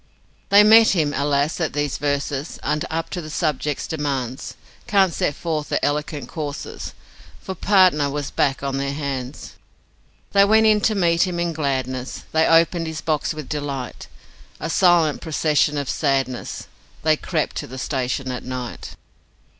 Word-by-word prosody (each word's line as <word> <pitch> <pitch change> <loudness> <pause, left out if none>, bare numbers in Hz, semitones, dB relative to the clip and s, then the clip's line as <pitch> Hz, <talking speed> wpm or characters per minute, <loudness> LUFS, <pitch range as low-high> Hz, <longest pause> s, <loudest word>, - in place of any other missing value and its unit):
They 200 +1 +8
met 220 0 +7
him 150 -4 +1
alas, 145 +2 +1
that 160 -3 -2
these 145 -2 -2
verses 145 +1 -2
Aren't 150 +1 -1
up 165 +1 -3
to 180 - -3
the 155 - -8
subject's 150 -2 -1
demands 135 -5 -3 0.3
Can't 195 -4 +3
set 145 - -1
forth 155 -3 -3
their - - +1
eloquent 150 0 -1
curses, 145 -3 -6 0.4
FOR 190 - -6
PARTNER 185 -6 +4
WAS 145 0 -4
BACK 140 0 0
ON 135 -1 -2
THEIR 140 0 -2
HANDS. 140 -2 -5 0.7
They 200 0 +6
went 220 +2 +5
in 215 -1 +4
to 215 - +2
meet 170 -1 +3
him 175 -1 -3
in 170 -1 -1
gladness, 130 -4 -3
They 160 0 +3
opened 165 0 +3
his 160 -1 -5
box 155 0 -1
with 155 -3 -7
delight 140 -4 -5 0.5
A 165 - -3
silent 175 -5 +3
procession 150 -1 +1
of 140 -2 -2
sadness 135 -4 -1 0.4
They 155 0 +4
crept 155 0 -2
to - - -4
the 130 - -9
station 130 0 -2
at 125 - -5
night. 125 -1 -6
150 Hz, 160 wpm, -22 LUFS, 140-170 Hz, 0.7 s, They